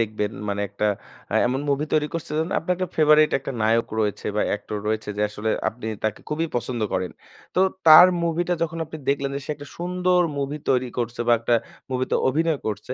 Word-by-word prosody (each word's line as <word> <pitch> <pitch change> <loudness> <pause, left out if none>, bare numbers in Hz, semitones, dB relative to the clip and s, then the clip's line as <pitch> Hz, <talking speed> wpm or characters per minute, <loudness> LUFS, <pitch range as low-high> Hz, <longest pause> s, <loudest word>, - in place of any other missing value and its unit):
দেখবেন 105 -1 -1 0.2
মানে 100 0 -1
একটা 100 +2 -2 0.4
অ্যা - - 0
এমন 130 +2 -1
মুভি 140 +2 +1
তৈরি 150 -1 +3
করছে 165 -2 -4
যেন 160 +2 0
আপনার 180 +2 -1
একটা 185 0 -2
ফেভারিট 155 0 +5
একটা 135 0 -6
নায়ক 115 +1 +2
রয়েছে 105 -2 -2
বা - - +2
অ্যাক্টর 105 0 -3
রয়েছে 110 -1 -2
যে 105 - 0
আসলে 105 +1 -3 0.2
আপনি 110 -1 -8 0.2
তাকে 110 -1 -1
খুবই 160 +2 -1
পছন্দ 120 -1 -3
করেন। 90 -1 -1 0.4
তো - - +3 0.3
তার 160 +3 +11 0.2
মুভিটা 170 +1 0
যখন 165 0 -2
আপনি 160 0 -9
দেখলেন 140 0 +1
যে - - -4
সে - - -4
একটা 145 0 -11
সুন্দর 180 +1 +1 0.2
মুভি 140 +2 -2
তৈরি 130 -1 +2
করছে, 120 0 -3
বা - - +6
একটা 120 +1 +2 0.4
মুভিতে 130 0 -1
অভিনয় 160 +2 +1
করছে। 110 +4 -4
135 Hz, 200 wpm, -23 LUFS, 110-160 Hz, 0.4 s, তার